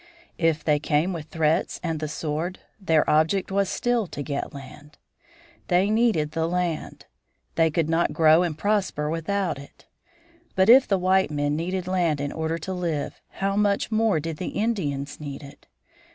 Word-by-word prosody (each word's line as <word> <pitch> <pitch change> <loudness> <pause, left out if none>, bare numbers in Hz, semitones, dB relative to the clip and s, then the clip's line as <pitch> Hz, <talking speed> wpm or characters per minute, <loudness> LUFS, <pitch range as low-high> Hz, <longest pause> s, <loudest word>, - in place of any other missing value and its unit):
If 165 -2 +1
they 150 -2 +2
came 155 +4 +1
with 160 -3 -6
threats 155 0 0
and 165 -3 -2
the 155 - -3
sword, 160 +4 -3 0.2
their 160 -6 +2
object 160 +6 +2
was, 195 -1 +1
still, 240 -4 0
to 145 - -6
get 140 0 -4
land. 145 +1 -12 0.7
They 185 +3 +2
needed 215 -10 +2
the 160 +1 -1
land. 175 -3 -3 0.5
They 165 -1 +3
could 160 0 0
not 165 +1 +1
grow 160 +1 +5
and 165 -4 -1
prosper 185 -5 0
without 170 0 -1
it. 140 - -15 0.7
But 190 +2 +3
if 260 +3 +8
the 195 - +2
white 190 +1 +2
men 145 0 -1
needed 180 +3 -2
land 175 -5 +1
in 145 0 -3
order 160 +1 -2
to 175 +4 -5
live 170 -5 -3
how 195 0 -2
much 205 +1 +1
more 220 -5 +2
did 160 0 -5
the 180 - -4
Indians 145 -11 -2
need 145 -1 -7
it! 140 - -14
165 Hz, 170 wpm, -25 LUFS, 150-190 Hz, 0.7 s, if